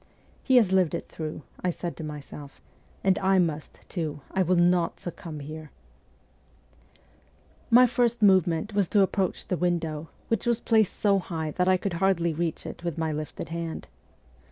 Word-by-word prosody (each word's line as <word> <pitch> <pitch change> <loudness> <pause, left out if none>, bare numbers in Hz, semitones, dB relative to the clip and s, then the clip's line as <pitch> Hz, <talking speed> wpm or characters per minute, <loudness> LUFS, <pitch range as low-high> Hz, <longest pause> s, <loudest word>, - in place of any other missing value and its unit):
' - - -32
He 260 - +3
has 220 -7 +5
lived 185 -4 +3
it - - -5
through,' 155 -1 -6 0.2
I 180 - +1
said 175 0 -4
to 160 - -6
myself, 145 -1 -9 0.2
' - - -32
and 195 0 +3
I 190 0 +3
must, 160 -4 -1
too; 155 -5 -4
I 190 - +1
will 185 0 +2
not 175 -1 +2
succumb 165 -3 -7
here! 155 +1 -8 1.0
' - - -31 0.7
My 250 +1 +8
first 240 -1 +1
movement 190 -1 +3
was 200 -3 +1
to 205 - +4
approach 190 -1 -1
the 180 - -2
window, 165 -3 -1 0.2
which 225 0 -1
was 235 -1 +2
placed 220 -4 +2
so 200 -2 +3
high 160 -4 -4
that 180 +4 0
I 185 0 +5
could 190 0 -3
hardly 170 -4 +2
reach 165 +1 -3
it - - -8
with 170 -3 -3
my 160 -1 -1
lifted 155 -1 -5
hand. 165 -1 -5
175 Hz, 180 wpm, -27 LUFS, 160-195 Hz, 1.0 s, My